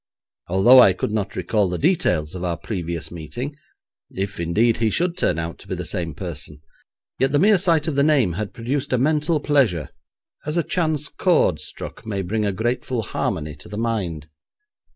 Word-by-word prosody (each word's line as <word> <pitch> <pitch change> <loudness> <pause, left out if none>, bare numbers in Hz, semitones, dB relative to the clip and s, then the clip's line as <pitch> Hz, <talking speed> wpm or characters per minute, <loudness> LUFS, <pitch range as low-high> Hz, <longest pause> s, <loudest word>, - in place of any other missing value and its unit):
Although 95 +9 +7
I 100 -6 +7
could 95 - -3
not 100 -2 -2
recall 95 +2 +1
the 90 - -2
details 90 - +1
of 90 -1 -6
our 85 -2 -1
previous 85 -4 -4
meeting, 120 - -6 0.5
if, 95 0 -4
indeed, 105 +8 +2
he 115 -1 +1
should 170 - 0
turn - - +1
out 85 0 -4
to - - -14
be - - -3
the - - -4
same 85 -4 -3
person, 75 -1 -5 0.6
yet 135 +1 +2
the 145 - +3
mere 200 +4 +5
sight 170 -4 +2
of 155 - -1
the 140 - +3
name 140 - +3
had 105 +3 -4
produced 130 +3 -3
a - - +4
mental 150 +4 +1
pleasure, 135 - +1 0.5
as 155 +3 -3
a 170 - +2
chance 155 -5 0
chord - - +2
struck - - -7
may 100 -4 -3
bring 105 +3 -1
a - - +1
grateful 120 +3 -2
harmony 75 -5 -3
to 75 - -13
the 105 - -6
mind. 95 -10 -2
110 Hz, 190 wpm, -22 LUFS, 90-145 Hz, 0.6 s, Although